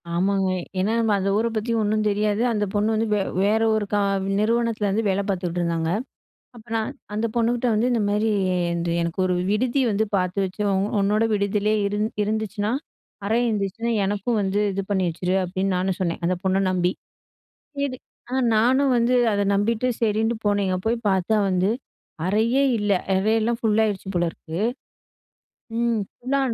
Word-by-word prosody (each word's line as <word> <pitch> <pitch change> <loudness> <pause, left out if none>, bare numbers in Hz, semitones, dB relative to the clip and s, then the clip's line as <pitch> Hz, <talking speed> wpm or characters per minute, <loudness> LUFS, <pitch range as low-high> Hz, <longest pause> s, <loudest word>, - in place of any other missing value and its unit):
ஆமாங்க. 190 +1 +1 0.3
ஏன்னா 200 +4 +1
நம்ம 225 -2 +1
அந்த 195 +1 0
ஊர 230 - +1
பத்தி 220 +2 -1
ஒன்னும் 215 +1 0
தெரியாது. 210 +1 0
அந்த 210 -2 0
பொண்ணு 210 +2 +1
வந்து 225 +1 0
வ 210 - +3 0.3
வேற 215 +2 +2
ஒரு 215 -1 0
க 210 - +1 0.4
நிறுவனத்துலருந்து 225 -2 +1
வேலை 195 +1 0
பாத்துட்ருந்தாங்க. 170 -3 -1 0.7
அப்ப 235 -1 -14
நான் 225 +3 -1 0.2
அந்த 215 +2 -1
பொண்ணுகிட்ட 235 +1 +1
வந்து, 225 +4 +2
"இந்தமாரி 210 -1 +1 0.5
இந்த 170 0 -2
எனக்கு 170 +2 -3
ஒரு 185 - +1 0.2
விடுதி 250 +5 +1
வந்து 210 +2 +1
பாத்து 185 0 -1
வச்சு, 185 +3 -6
உ - - +1 0.3
உன்னோட 210 +3 +2
விடுதியிலேயே 205 +1 +1
இருந் 205 +1 0 0.2
இருந்துச்சுன்னா 215 0 -2 0.5
அறை 220 +3 +1
இருந்துச்சுனா, 220 +2 -1
எனக்கும் 205 +3 -1
வந்து 195 +1 0
இது 195 +1 -2
பண்ணி 190 -2 +1
வச்சுரு", 180 +3 -1
அப்டீன்னு 190 +1 -1
நானும் 185 0 -1
சொன்னேன், 175 -2 -2
அந்த 185 +1 +1
பொண்ண 190 +1 +2
நம்பி. 180 -1 +1 0.9
சரி. 270 -2 -2 0.3
அ - - -3 0.2
நானும் 260 +4 +3
வந்து 235 +1 +2 0.2
அத 205 - +1
நம்பிட்டு 225 +4 +1
சரின்னு 225 +1 +1
போனேங்க. 200 -2 +1
போய் 230 +2 +1
பாத்தா 190 +3 +1
வந்து 185 +1 +1 0.6
அறையே 225 +7 +2 0.2
இல்ல. 205 0 0 0.3
அறையெல்லாம் 225 +4 +1
ஃபுல்லாயிடுச்சு 215 -3 +1
போல 175 - +2
இருக்கு. 160 0 -8 1.2
ம். 235 -1 +1 0.2
ஃபுல்லா. 275 +3 -1
210 Hz, 155 wpm, -23 LUFS, 190-225 Hz, 1.2 s, வ